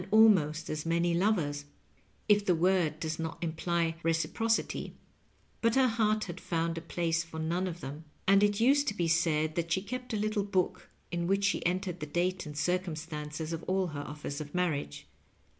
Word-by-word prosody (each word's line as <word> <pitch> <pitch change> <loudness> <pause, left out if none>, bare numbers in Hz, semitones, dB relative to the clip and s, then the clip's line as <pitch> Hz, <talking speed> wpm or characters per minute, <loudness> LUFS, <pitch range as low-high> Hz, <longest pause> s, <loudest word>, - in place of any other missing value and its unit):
213 215 - +5 0.2
almost 155 0 -3
as 155 0 -3
many 170 +1 +1
lovers, 170 -6 +1 0.6
if 210 -1 +5
the 180 -3 +3
word 170 -3 +2
does 155 0 -3
not 160 0 -3
imply 165 0 0
reci« 165 0 +1
procity; 225 0 -1 0.7
but 230 0 +3
her 265 -1 +5
heart 215 -2 +1
had 175 -1 -7
found 165 -1 -1
a 165 - -4
place 170 0 -1
for 165 -1 -10
none 170 +4 -1
of 175 -1 -6
them, 145 +4 -7 0.2
and 195 +1 +6
it 205 0 +3
used 280 +5 +4
to 205 - 0
be 175 -4 0
said 160 -1 +2
that 170 0 -2
die 185 +3 +1
kept 255 +5 -5
a 220 - 0
little 210 0 0
book 190 -3 -1 0.2
in 170 0 -1
which 195 +1 +2
she 200 - +1
entered 180 0 -2
the 150 - -5
date 175 +3 -1
and 150 -1 -8
circumstances 160 -2 -2
of 165 - -3
all 185 -1 +1
her 145 -2 -5
offers 145 0 -6
of 145 +1 -8
marriage. 150 - -1
170 Hz, 190 wpm, -31 LUFS, 160-195 Hz, 0.7 s, and